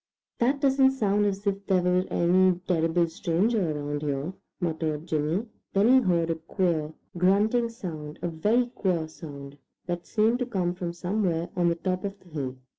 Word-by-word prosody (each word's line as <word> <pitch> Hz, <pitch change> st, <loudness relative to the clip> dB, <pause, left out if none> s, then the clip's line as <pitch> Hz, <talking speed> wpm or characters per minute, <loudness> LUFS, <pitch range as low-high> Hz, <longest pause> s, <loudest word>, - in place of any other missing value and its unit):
"That 265 Hz, +4 st, +2 dB
doesn't 270 Hz, -1 st, +4 dB
sound 205 Hz, -4 st, +2 dB
as 200 Hz, +1 st, -3 dB
if 200 Hz, 0 st, -1 dB
there 185 Hz, -2 st, +3 dB
were 180 Hz, +1 st, +2 dB
any 180 Hz, +1 st, +3 dB
terrible 170 Hz, 0 st, +2 dB
stranger 175 Hz, +4 st, 0 dB
around 145 Hz, 0 st, -3 dB
here," 145 Hz, +3 st, -2 dB, 0.3 s
muttered 160 Hz, -3 st, -2 dB
Jimmy. 160 Hz, +6 st, 0 dB, 0.3 s
Then 200 Hz, +4 st, +4 dB
he 260 Hz, +1 st, +7 dB
heard 170 Hz, -5 st, +1 dB
a -, -, 0 dB
queer, 160 Hz, -2 st, -1 dB, 0.3 s
grunting 210 Hz, +6 st, +3 dB
sound, 155 Hz, -9 st, -7 dB
a -, -, +1 dB
very 210 Hz, +9 st, +2 dB
queer 185 Hz, -9 st, -1 dB
sound, 145 Hz, -3 st, -10 dB, 0.3 s
that 175 Hz, 0 st, -4 dB
seemed 225 Hz, +2 st, +2 dB
to 250 Hz, -, -1 dB
come 185 Hz, -7 st, -1 dB
from 175 Hz, -1 st, -4 dB
somewhere 175 Hz, -1 st, -1 dB
on 175 Hz, -1 st, +3 dB
the 170 Hz, -, +1 dB
top 185 Hz, +2 st, -2 dB
of 200 Hz, 0 st, -5 dB
the 180 Hz, -, -20 dB
hill. 135 Hz, -5 st, -4 dB
180 Hz, 175 wpm, -27 LUFS, 160-205 Hz, 0.3 s, he